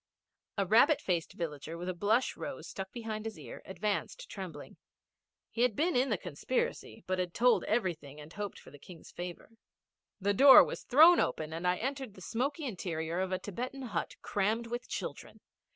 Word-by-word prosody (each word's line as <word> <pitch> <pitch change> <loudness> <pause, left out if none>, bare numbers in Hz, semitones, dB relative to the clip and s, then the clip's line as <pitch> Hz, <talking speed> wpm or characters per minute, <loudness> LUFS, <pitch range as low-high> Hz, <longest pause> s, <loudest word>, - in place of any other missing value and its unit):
A 200 - +1
rabbit 275 - +5
faced 175 - -2
villager, 160 -1 -5
with 175 +1 -6
a 185 - -1
blush 215 +8 +1
rose 280 - -6
stuck 190 -1 -6
behind 220 -2 -5
his 220 -1 -5
ear, - - -9
advanced 210 - -3
trembling. 180 -7 -8 0.7
He 235 - -3
had 245 -4 +3
been 335 - +1
in 255 +2 +3
the 210 - +1
conspiracy, 185 - -3
but 185 0 -1
had 180 -1 -2
told 245 +1 +4
everything 165 - -2
and 150 +2 -11
hoped 205 -2 -5
for - - -14
the 145 - -14
King's 170 +2 -13
favour. 175 +4 -7 0.7
The 200 +1 +1
door 270 +6 +10
was - - -5
thrown 320 +7 +7
open 155 0 -1
and 170 +2 -2
I 180 - +3
entered 265 -2 -4
the 185 - -13
smoky 275 - -2
interior 170 -6 -3
of 190 0 -1
a 185 - +1
Thibetan 250 +8 -5
hut - - -2
crammed 215 +4 0
with 240 +1 -5
children. - - -6
205 Hz, 185 wpm, -32 LUFS, 175-245 Hz, 0.7 s, door